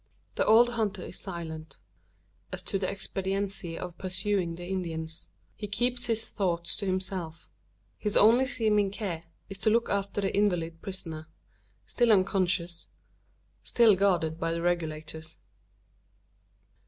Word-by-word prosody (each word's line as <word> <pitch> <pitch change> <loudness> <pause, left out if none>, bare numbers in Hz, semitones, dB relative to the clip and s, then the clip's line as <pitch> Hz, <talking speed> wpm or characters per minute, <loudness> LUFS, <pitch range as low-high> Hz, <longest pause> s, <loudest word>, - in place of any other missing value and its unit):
The - - +1
old 230 +3 +7
hunter 210 -5 -1
is - - -6
silent, 165 -4 -7 0.7
as - - -4
to 195 - -1
the 185 - -1
expediency 195 -2 -3
of 180 -1 -7
pursuing 185 -2 -1
the 175 +1 -7
Indians. 165 -4 -4 0.3
He 210 - -5
keeps 240 +4 +1
his 225 -1 +1
thoughts 170 -3 0
to 200 - -2
himself: 185 -3 -3 0.5
his 210 - +1
only 240 +5 +6
seeming 215 -6 +2
care 190 -5 -4 0.2
is 195 -1 -7
to 215 - +3
look 230 +2 +2
after 200 0 -1
the 195 -1 0
invalid 175 -5 +1
prisoner 165 -6 -6 0.6
still 240 -2 +2
unconscious 185 -3 +1 0.7
still 230 -4 +5
guarded 175 -5 +1
by 165 0 0
the 170 0 -3
Regulators. 160 -2 -2
190 Hz, 130 wpm, -29 LUFS, 170-205 Hz, 0.7 s, old